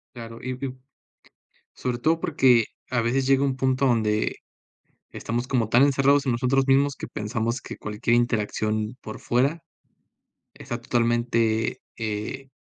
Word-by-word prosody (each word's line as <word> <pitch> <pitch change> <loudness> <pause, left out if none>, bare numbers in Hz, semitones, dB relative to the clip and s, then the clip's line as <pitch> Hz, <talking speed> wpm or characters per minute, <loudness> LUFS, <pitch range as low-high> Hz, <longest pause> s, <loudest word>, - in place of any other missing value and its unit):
Claro, 115 -1 -9
y 130 - -4
ib 130 0 -5 0.9
sobre 125 -1 -3
todo 160 +6 +1
porque 130 -8 +4 0.2
a 125 -2 0
veces 125 +3 +1
llega 135 0 +3
un 135 -2 0
punto 130 0 +1
donde, 110 -4 +1 0.8
estamos 120 +2 -3
como 120 -5 0
tan 120 +4 +5
encerrados 140 0 +3
en 130 - +2
nosotros 130 +3 +1
mismos 140 +1 +3
que - - -6
pensamos 115 +3 -3
que - - -8
cualquier 105 +3 0
interacción 110 -1 -1
por 110 - -8
fuera, 140 +7 0 0.9
está 120 - -6
totalmente, 115 -2 0 0.2
eh, 110 +5 -4
120 Hz, 140 wpm, -25 LUFS, 115-135 Hz, 0.9 s, tan